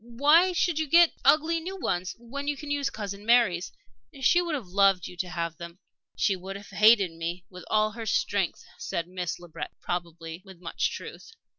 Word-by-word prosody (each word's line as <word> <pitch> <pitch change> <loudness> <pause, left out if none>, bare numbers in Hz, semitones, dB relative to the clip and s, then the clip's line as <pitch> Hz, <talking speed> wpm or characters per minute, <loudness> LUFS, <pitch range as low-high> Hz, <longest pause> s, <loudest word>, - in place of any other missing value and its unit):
Why 295 +10 +4
should 345 -2 +1
you 315 - -1
get 340 +2 +6
ugly 320 +2 +4
new 375 +4 -6
ones, 180 - -2
when 270 +5 -7
you 290 -1 -1
can 290 +1 -7
use 285 -1 0
Cousin 200 -1 -6
Mary's? 225 -6 +3 0.5
She 345 +7 +4
would 340 -3 -2
have 260 -7 -5
loved 195 -1 +3
you 180 - -8
to 180 0 -3
have 170 -2 -4
them." 170 0 -9 0.4
"She 200 -2 +2
would 190 +1 -8
have 200 0 -10
hated 210 -4 +5
me 170 +2 -5
with 180 0 -10
all 215 0 +2
her 225 +1 -7
strength," 200 -3 0
said 170 0 -3
Miss 180 -2 -4
Le 175 - -12
Breton, 165 0 -7
probably 170 -1 -5
with 190 -3 -14
much 170 -2 -1
truth. 455 - -9
200 Hz, 195 wpm, -27 LUFS, 175-285 Hz, 0.5 s, get